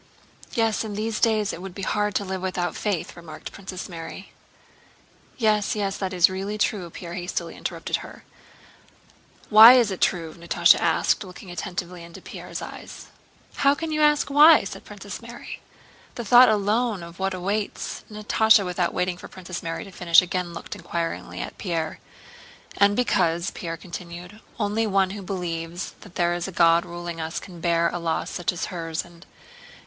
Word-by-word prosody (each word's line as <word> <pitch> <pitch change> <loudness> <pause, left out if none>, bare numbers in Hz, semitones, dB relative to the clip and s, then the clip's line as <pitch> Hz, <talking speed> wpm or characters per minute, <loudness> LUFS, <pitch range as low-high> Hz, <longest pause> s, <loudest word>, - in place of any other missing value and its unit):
"Yes, 225 -3 +1
in 210 -2 -5
these 215 +1 -2
days 215 -3 +2
it 175 - -7
would 190 -1 -8
be 195 - -6
hard 210 0 0
to 200 - 0
live 190 -1 -4
without 185 -1 -2
faith..." 200 -6 -2
remarked 165 -3 -9
Princess 190 -2 -7
Mary. 170 +2 -8 1.1
"Yes, 215 -3 +2
yes, 200 -2 -1
that 190 -2 -3
is 180 -1 +5
really 195 +3 -4
true," 205 -4 -1
Pierre 170 +1 -8
hastily 180 +1 -4
interrupted - - -3
her. - - -11 1.3
"Why 220 +3 +11
is 240 -5 +4
it 190 - -5
true?" 165 -3 0
Natásha 170 0 +4
asked, - - +2
looking 185 -1 -11
attentively 180 -1 -5
into 170 0 -11
Pierre's - - -8
eyes. - - -10 0.5
"How 280 +1 +4
can 325 +2 -4
you 305 0 0
ask 295 -1 +3
why?" 300 +3 +8
said - - -8
Princess - - -8
Mary. - - -9 0.5
"The 235 - -5
thought 245 +3 +8
alone 215 -1 +1
of 170 +1 -11
what 190 0 -1
awaits..." 200 +3 -3
Natásha 215 0 +4
without 180 -1 -1
waiting 180 0 0
for - - -10
Princess 180 -1 -7
Mary 165 0 -4
to 195 - -12
finish 170 -2 +5
again 180 0 -2
looked 170 - -7
inquiringly 170 -3 -4
at - - -7
Pierre. 165 -4 -2 0.8
"And 200 0 +4
because," 170 -7 +1
Pierre 165 -1 -5
continued, 175 +3 -9 0.2
"only 220 +1 0
one 195 -2 +2
who 200 0 -6
believes 175 -2 -4
that 190 - -14
there 175 0 +2
is 175 +1 -3
a - - -6
God 170 0 +4
ruling 175 -1 -6
us 160 +1 -3
can 175 -3 -11
bear 170 -1 +2
a 175 - -4
loss 165 -1 -2
such 175 - -1
as 180 +2 -5
hers 165 -2 -3
and... 175 0 -17
185 Hz, 175 wpm, -24 LUFS, 170-210 Hz, 1.3 s, Why